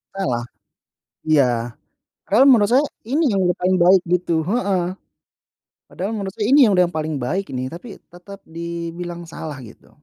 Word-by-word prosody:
Salah, 125 -12 -2 0.8
iya. 150 -4 +4 0.8
Padahal 230 +7 +4
menurut 210 -5 +5
saya 275 +4 +4 0.2
ini 300 +7 +1
yang 195 -2 0
udah 180 - +2
paling 185 +1 +2
baik 180 +2 +5
gitu 170 -2 0
heeh. 195 -1 0 1.1
Padahal 195 +4 -4
menurut 200 -3 -4
saya 210 - -3
ini 285 +2 +6
yang 210 - +3
udah 180 - +6
yang 175 - -7
paling 155 -1 -3
baik 185 +11 -2
ini, 130 0 -3
tapi 175 +9 -10 0.3
tetap 195 +3 -12
dibilang 170 +1 -6
salah 155 -3 -7
gitu. 115 -2 -15
180 Hz, 160 wpm, -20 LUFS, 165-200 Hz, 1.1 s, ini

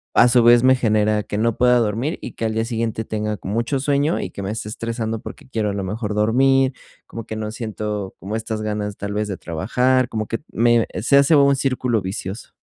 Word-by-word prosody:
a 120 - +6
su 120 -1 +4
vez, 120 +1 +6
me 130 0 +6
genera 110 -3 +1
que 105 - -4
no 115 +1 0
pueda 125 0 +4
dormir 115 - -1
y - - -7
que 115 - -3
al 110 - -1
día 110 +1 0
siguiente 115 -1 -2
tenga 105 -1 -2
con 95 +2 -6
mucho 115 +5 0
sueño 145 +3 +1
y - - -4
que 100 - -7
me 95 - -3
esté 110 -1 -5
estresando 115 0 -3
porque - - -10
quiero 110 -4 -1
a - - -4
lo 100 -1 -3
mejor 105 +2 -3
dormir, 130 +5 +3 0.4
como 115 -1 -8
que 110 - -6
no 110 0 -4
siento 105 -3 -4
como 100 +3 -5
estas 110 -1 -4
ganas 105 -1 -3
tal 100 0 -5
vez 105 0 -1
de 100 - -3
trabajar, 125 +10 +1
como 110 -1 -3
que 115 - -2
me 120 0 +3
se 140 +5 +4
hace 140 +3 +5
un 140 -1 +5
círculo 130 -4 0
vicioso. 95 +2 -6
110 Hz, 225 wpm, -21 LUFS, 105-125 Hz, 0.4 s, a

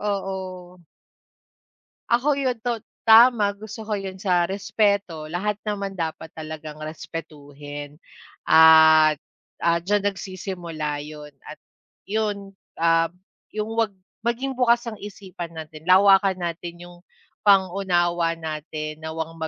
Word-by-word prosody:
oo. 200 -2 -2 1.8
Ako 275 +4 +2
'yon, 260 -3 0
to 240 -2 -1 0.2
tama 225 -2 +6
gusto 215 +2 -9
ko 210 -1 -2
'yon, 195 -1 -6
sa 175 -3 +2
respeto 200 -4 0
lahat 195 +6 -2
naman 200 -2 -3
dapat 160 0 -4
talagang 155 -1 -7
respetuhin 145 -2 -8 0.5
at, 160 -1 +7 0.4
ah, 170 0 +2
diyan 205 +2 0
nagsisimula 175 -6 -4
'yon 150 -1 -10
at - - -10 0.5
'yon, 205 -2 -2 0.2
ah, 165 0 +3 0.4
'yong 215 +1 -4
'wag 225 -2 +1 0.3
maging 250 +3 -2
bukas 240 -1 +2
ang 225 - -4
isipan 190 -4 -8
natin 155 0 -9
lawakan 190 +1 +5
natin 170 0 -5
'yong 175 0 -14 0.4
pang-unawa 175 -4 +2
natin 155 -1 -6
na, 160 - -5
wang 160 0 -5
180 Hz, 115 wpm, -23 LUFS, 160-205 Hz, 1.8 s, at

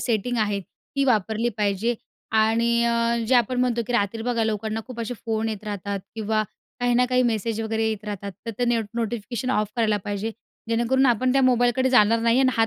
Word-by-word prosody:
setting 240 +1 -1
आहे 205 -1 -1
ती 275 +8 -5
वापरली 225 -1 +1
पाहिजे 210 +3 0 0.4
आणि 230 +2 +3
अ, 235 0 +2
जे 255 - +3
आपण 245 +1 +2
म्हणतो, 240 -2 +1
की 245 - -3
रात्री 225 0 0
बघा 235 -1 0
लोकांना 220 0 -2
खूप 250 -2 -7
असे 240 +2 -3
फोन 225 0 0
येत 215 -1 -5
राहतात 200 -1 -4
किंवा 220 -1 0 0.4
काही 245 0 +2
ना 250 - +4
काही 255 0 +2
मेसेज 225 -2 0
वगैरे 220 0 0
येत 215 -1 -4
राहतात 200 -1 -5
तर - - -1
ते 245 - +2
नेट 235 -2 +1
नोटिफिकेशन 235 +2 -3
ऑफ 210 -4 +1
करायला 220 -2 +2
पाहिजे, 205 +1 -2 0.4
जेणेकरून 240 +4 +2
आपण 250 +1 +2
त्या 270 0 +3
मोबाईलकडे 250 +1 +3
जाणार 230 -2 +5
नाही 230 +2 +3
आणि 260 - +4
हात 225 0 +4
230 Hz, 200 wpm, -24 LUFS, 215-245 Hz, 0.4 s, जाणार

